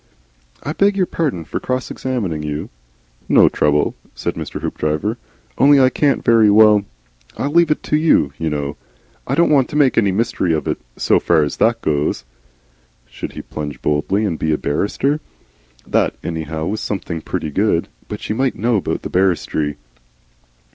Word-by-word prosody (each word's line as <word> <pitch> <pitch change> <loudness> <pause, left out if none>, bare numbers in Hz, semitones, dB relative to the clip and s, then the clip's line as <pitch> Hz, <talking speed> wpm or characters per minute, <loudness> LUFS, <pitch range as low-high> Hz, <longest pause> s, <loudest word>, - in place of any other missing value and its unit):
"I 150 - -3
beg 200 +3 +2
your 185 - +3
pardon 140 - -2
for - - -4
cross 130 0 -3
examining 105 -12 -3
you." 75 0 -4 0.6
"No - - +6
trouble," 75 0 +1 0.2
said - - -3
Mr. - - -6
Hoopdriver. 75 +9 -2 0.4
"Only 140 +1 +6
I 130 -1 +5
can't 140 +2 +1
very 115 -2 +5
well 105 -1 +6 0.5
I - - -2
leave 170 +3 +3
it 150 - 0
to - - 0
you, 150 - +3
you 80 - -1
know. 75 -1 -3 0.5
I - - 0
don't 170 -2 +3
want 135 -4 +3
to 150 - -7
make 140 -5 +4
any 100 -4 +2
mystery 95 -4 0
of 80 - -3
it, - - -1 0.2
so - - +3
far 80 -3 +3
as 75 - -3
that 115 0 +2
goes." 75 -4 0 0.8
Should - - -8
he - - -7
plunge 75 -3 -6
boldly 90 +8 +1
and 85 -6 -2
be 80 - 0
a 75 - +2
barrister? 135 - -1 0.7
That - - +1
anyhow 80 -1 -4
was 105 +4 -2
something 85 -5 -4
pretty 75 - -4
good. 95 0 +1 0.2
But - - -6
she - - -3
might 130 +3 0
know 115 0 +1
about 95 - -3
barristry. 85 -5 0
100 Hz, 170 wpm, -19 LUFS, 80-130 Hz, 0.8 s, No